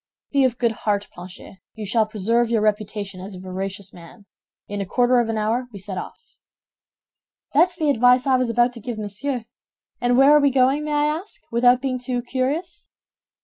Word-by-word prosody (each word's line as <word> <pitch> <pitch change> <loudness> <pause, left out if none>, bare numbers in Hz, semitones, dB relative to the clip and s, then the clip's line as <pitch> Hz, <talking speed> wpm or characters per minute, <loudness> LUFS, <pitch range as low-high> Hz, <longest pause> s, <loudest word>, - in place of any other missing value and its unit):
"Be 280 -1 +3
of 245 -2 0
good 235 -2 +1
heart, 205 -2 -2
Planchet, 180 +1 -12 0.2
you 220 -1 -6
shall 215 +2 +1
preserve 225 +3 0
your 230 -2 +1
reputation 210 -2 -2
as 195 +1 -8
a - - -9
veracious 190 +1 -6
man. 175 +5 -14 0.4
In 205 0 -4
a - - -2
quarter 245 +4 +3
of 235 -1 0
an 225 - -1
hour 225 +4 -1
we 205 - -9
set 190 0 -7
off." - - -9 1.3
"That's 350 +5 +4
the 310 -4 +1
advice 250 0 +4
I 265 -1 +3
was 255 -2 0
about 240 +1 +2
to 235 - -8
give 235 0 -5
Monsieur; 220 +4 -3 0.6
and 245 0 +2
where 270 +2 +7
are 300 - +5
we 285 - +4
going, 270 +3 +2
may 300 - -2
I 295 0 +2
ask, 320 +7 -4
without 245 +2 +4
being 255 -2 -1
too 245 -1 -3
curious?" 295 +8 -3
240 Hz, 195 wpm, -22 LUFS, 205-260 Hz, 1.3 s, where